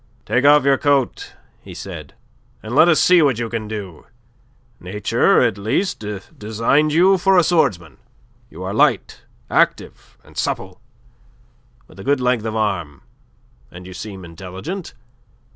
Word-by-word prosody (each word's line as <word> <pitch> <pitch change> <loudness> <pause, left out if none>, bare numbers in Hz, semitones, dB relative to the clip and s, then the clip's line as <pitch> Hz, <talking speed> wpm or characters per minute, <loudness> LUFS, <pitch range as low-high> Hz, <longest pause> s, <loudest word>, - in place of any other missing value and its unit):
"Take 130 +3 +1
off 145 0 +6
your 140 -1 +3
coat," 140 -3 0 0.3
he - - -12
said, - - -9 0.5
"and 110 +2 -6
let 155 +5 +6
us 165 -3 +4
see 180 -1 +5
what 140 -6 +2
you 115 -1 -3
can 110 -2 -4
do. 100 -7 -8 0.7
Nature, 105 +7 +1
at 115 -5 0
least, 110 - -1 0.4
designed 115 +8 +1
you 185 +4 +4
for 190 +1 +3
a 175 - +5
swordsman. 90 - 0 0.5
You - - -10
are - - -4
light, - - +1 0.3
active, - - -1
and - - -19
supple, - - -4 1.1
with 95 - -17
a - - -8
good 140 +3 +1
length 125 -3 0
of 110 0 -3
arm, 95 -7 -2 0.7
and 90 +1 -12
you 95 - -10
seem 95 0 -8
intelligent. 95 - -8
115 Hz, 145 wpm, -19 LUFS, 95-150 Hz, 1.1 s, off